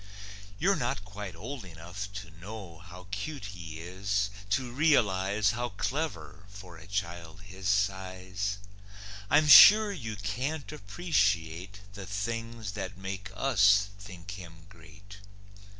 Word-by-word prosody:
You're 195 - +3
not 125 -7 -2
quite 100 -4 -7
old 120 +7 -7
enough 90 +3 -8
to 100 -5 -8
know 90 0 -9
How 90 0 -12
cute 105 +5 -4
he 85 -3 -8
is; 100 +3 -1 0.2
to 125 +2 0
realize 105 -8 +3
How 120 +1 -3
clever 105 - -4
for 100 -3 -11
a 90 - -13
child 85 -2 -4
his 95 0 -5
size. 95 0 -1 0.7
I'm 155 +1 +5
sure 210 +7 +10
you 115 - -5
can't 125 +11 -3
appreciate 100 - -1
The 100 -2 -8
things 115 +1 -4
that 95 -1 -6
make 95 +1 -6
us 105 -5 +4
think 100 -2 -10
him 85 -4 -10
great. 100 +1 -15
100 Hz, 125 wpm, -29 LUFS, 95-115 Hz, 0.7 s, sure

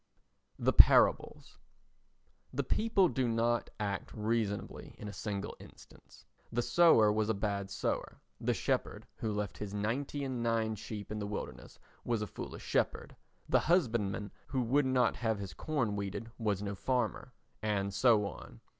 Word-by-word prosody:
The - - +2
Parables - - +5 0.9
The - - -1
people 215 -4 +3
do 130 -6 0
not 115 +1 +1
act 100 -2 -2
reasonably 110 -2 -2
in 105 - -7
a 105 - -6
single 100 -2 -4
instance. - - -16 0.3
The 120 +1 0
sower 160 -12 +6
was 110 0 0
a 110 - +2
bad 100 -1 -2
sower; - - -3 0.2
the - - 0
shepherd - - -1
who 110 - -2
left 105 -4 -3
his 105 -1 -5
ninety 130 +7 -2
and 130 -3 -3
nine 115 -1 +1
sheep 105 0 -7
in 110 - -3
the 105 - -3
wilderness 105 - -6 0.3
was 115 -3 0
a - - -1
foolish - - -8
shepherd; - - -1 0.3
the - - +4
husbandman 115 - +1 0.2
who 130 -2 0
would 135 +4 +2
not 125 -2 +2
have 110 -3 0
his 100 -2 -6
corn 125 -10 -1
weeded 100 +3 -4
was 105 -3 0
no 100 0 -3
farmer—and 110 -3 -2
so 105 +1 +4
on. 80 - -8
110 Hz, 155 wpm, -33 LUFS, 105-120 Hz, 0.9 s, sower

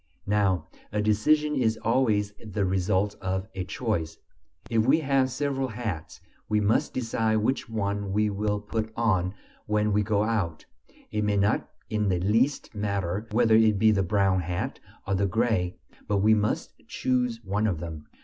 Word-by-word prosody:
Now 95 -6 +1 0.2
a 105 - -1
decision 150 +9 +2
is 115 -4 +1
always 110 -4 +1
the 105 -2 -2
result 95 +2 +1
of 95 +1 -2
a 95 - -3
choice. 90 -5 -2 0.5
If 115 -2 +2
we 140 +7 +4
have 135 -2 +2
several 135 0 -1
hats, 110 -9 -5 0.3
we 105 - +3
must 105 +2 +1
decide 115 -3 0
which 110 +3 0
one 100 -2 -2
we 105 +2 +2
will 105 +1 -1
put 110 +1 -3
on 95 -5 +1 0.3
when 105 0 +1
we 105 - +3
go 105 0 +1
out; 100 -8 -1 0.5
it 105 0 0
may 105 -1 +1
not 100 +1 +1 0.2
in 105 -2 0
the 90 -2 +1
least 115 +11 +1
matter 100 -1 -2
whether 115 0 +3
it 110 -2 +5
be 110 +2 +5
the 100 -2 +2
brown 95 -1 +2
hat 90 +9 -3 0.3
or 100 - -1
the 100 +1 +2
gray, 95 -4 0 0.3
but 105 - +1
we 105 +3 +4
must 105 -1 0
choose 125 -2 0
one 105 +2 0
of 90 -6 -1
them. 80 -3 -7
105 Hz, 170 wpm, -27 LUFS, 95-115 Hz, 0.5 s, it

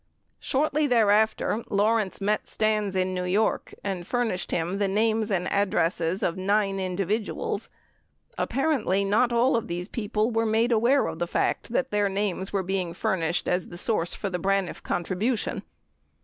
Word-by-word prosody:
Shortly 300 +2 +1
thereafter, 220 -1 +2
Lawrence 210 0 +1
met 210 +1 0
Stans 215 -2 0
in 185 0 0
New 180 0 -2
York 200 +5 0
and 190 -3 -3
furnished 235 -7 -1
him 175 +4 -1
the 200 - +2
names 220 +2 +1
and 185 -3 0
addresses 185 -1 +1
of 170 - 0
nine 195 +1 +1
individuals. 195 +3 -2 0.7
Apparently 250 - 0
not 225 +5 +2
all 240 +3 +3
of 230 - -1
these 175 +1 -4
people 220 0 -1
were 225 0 +1
made 225 +3 +2
aware 235 +5 +3
of - - -4
the 175 - -1
fact 205 - -1
that 265 +2 0
their 205 -1 +2
names 195 -1 -2
were 195 -2 0
being 185 -2 -2
furnished 170 -1 -1
as 180 0 0
a 175 - -9
source 175 -3 0
for 200 - -4
the 180 - -2
Braniff 195 0 0
contribution. 200 +7 -1
200 Hz, 160 wpm, -26 LUFS, 185-225 Hz, 0.7 s, all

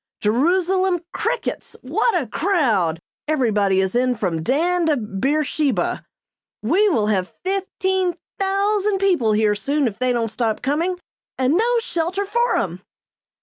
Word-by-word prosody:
Jerusalem 355 - +2
crickets! - - -3
What 450 -7 +1
a 280 - -3
crowd! 225 - +1 0.3
Everybody 210 -10 +2
is 190 -1 0
in 250 +1 +2
from 180 -7 -2
Dan 335 - +1
to 300 -2 +2
Beersheba! 265 - -1 0.6
We 380 - +3
will 225 - +1
have 195 -3 -1
fifteen 380 -1 -1 0.2
thousand 400 +1 +1
people 355 - +2
here 210 0 +3
soon 275 +7 0
if 215 -2 -6
they 255 0 +1
don't 235 -2 0
stop 220 0 -2
coming, 330 +7 0 0.4
and 260 +2 +2
no 470 +7 +2
shelter 360 -1 -2
for 475 +4 +1
'em!" - - -3
295 Hz, 135 wpm, -21 LUFS, -, 0.6 s, We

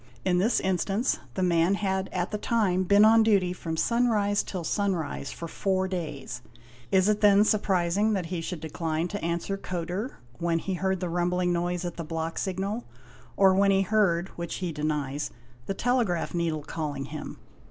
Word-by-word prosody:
In 180 -1 +3
this 220 +6 +2
instance, 195 +5 0 0.2
the 185 - 0
man... 175 +1 +3
had 190 -1 -1
at 180 0 -2
the 210 - -2
time 195 -5 +1
been 205 +3 +6
on 225 +1 +7
duty 200 -5 +3
from 165 -3 -5
sunrise 215 -2 +2
till 185 -3 -5
sunrise 170 -7 -1
for 170 - -6
four 190 +2 0
days. 150 -9 -5 0.5
Is 190 0 +4
it 210 0 +2
then 205 -1 +6
surprising 205 -1 +2
that 190 -4 -1
he 170 0 -3
should 165 -1 -5
decline 160 +1 -2
to 205 - -5
answer 170 +4 -1
Kodur 185 +5 -4 0.2
when 170 -1 +1
he 190 +3 -3
heard 190 +1 -1
the 180 - -2
rumbling 175 +1 +1
noise 175 +1 -1
at 175 - -5
the 170 - -3
block 165 +1 -3
signal, 195 +5 -2 0.5
or 190 -1 +6
when 195 +1 +4
he 195 0 +4
heard 190 -4 +2
(which 170 -1 -5
he 180 -3 -3
denies) 150 -2 -2 0.4
the 195 - -2
telegraph 230 -8 0
needle 165 -3 -1
calling 145 -3 -4
him. 150 +1 -7
180 Hz, 175 wpm, -27 LUFS, 170-200 Hz, 0.5 s, on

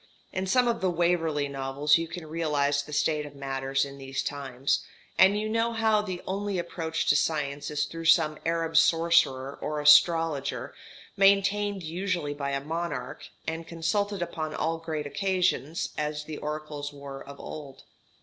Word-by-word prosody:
In 190 0 -2
some 250 +5 +3
of 235 -1 0
the 190 - +2
Waverley 165 -4 +1
Novels 140 +3 +2
you 165 - -3
can 165 0 -7
realize 150 -3 0
the 150 - -11
state 150 +1 +1
of 145 -1 -10
matters 135 0 -1
in 140 0 -10
these 135 0 -3
times; 135 -2 -1 0.4
and 200 +2 +6
you 215 - -2
know 230 +1 0
how 220 -2 +3
the 185 -4 -5
only 200 0 -2
approach 165 -2 -2
to - - +4
science 145 -3 0
is 150 0 0
through 165 0 -7
some 155 -2 +4
Arab 165 0 0
sorcerer 165 -5 +3
or 150 0 -2
astrologer, 150 -4 +4 0.4
maintained 200 0 +3
usually 170 -2 -2
by 140 -1 -3
a 140 0 -2
monarch, 160 -6 -4 0.2
and 165 +1 -4
consulted 195 +3 -1
upon 155 -2 -4
all 165 +1 -1
great 160 -2 -4
occasions, 180 -3 0
as 150 0 -2
the 150 0 -7
oracles 150 -1 -5
were 140 -1 -9
of 140 0 -11
old. 140 -3 -9
160 Hz, 160 wpm, -28 LUFS, 145-175 Hz, 0.4 s, and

